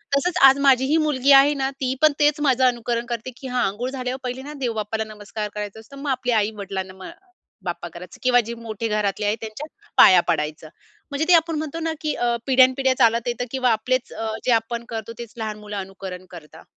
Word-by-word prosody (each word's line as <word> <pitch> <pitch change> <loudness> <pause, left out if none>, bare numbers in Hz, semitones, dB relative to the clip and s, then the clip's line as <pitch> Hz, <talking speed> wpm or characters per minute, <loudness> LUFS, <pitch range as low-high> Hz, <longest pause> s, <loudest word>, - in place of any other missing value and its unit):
तसचं 350 +5 0
आज 270 +1 +5
माझीही 275 +2 +4
मुलगी 285 -3 +2
आहे 275 +2 +7
ना, 270 -1 -1
ती 265 -2 -2
पण 310 -1 +6
तेच 295 0 +3
माझं 265 -3 +2
अनुकरण 240 -1 0
करते 235 +2 -4
की 265 - -8
"हां, 250 -1 0
अंघोळ 230 +6 -3
झाल्यावर 255 -1 -4
पहिले 250 +1 -4
ना, 290 +3 -8
देव 245 -4 -1
बाप्पाला 220 0 -2
नमस्कार 210 0 -6
करायचा 210 0 -5
असतो, 225 +5 -14
मग 280 +1 -5
आपली 250 -1 -1
आई-वडिलांना 200 -3 -2
म 190 0 -13
अ, - - -9 0.5
बाप्पा 175 -1 -4
करायचं 180 +1 -11
किंवा 250 -1 +5
जे 235 - -4
मोठे 230 -1 -5
घरातले 210 -1 -1
आहेत 210 +2 +1
त्यांच्या 225 +7 -7 0.3
पाया 185 -2 +8
पडायचं." 155 +1 -2 0.4
म्हणजे 285 +3 -1
ते 360 - +5
आपण 330 -1 +3
म्हणतो 310 +1 -4
ना, 325 0 -2
की 305 -1 -1
अ, 240 -1 0
पिढ्यानपिढ्या 260 0 +4
चालत 235 -1 +3
येतं 245 0 -2
किंवा 255 -2 +1
आपलेचं 250 +3 -1
अ, 220 0 -3
जे 255 - +2
आपण 235 +1 0
करतो, 225 0 -5
तेच 235 -2 -8
लहान 215 -2 -4
मुलं 210 -1 -7
अनुकरण 190 -1 -7
करतात. 160 -2 -12
240 Hz, 210 wpm, -22 LUFS, 210-265 Hz, 0.5 s, पाया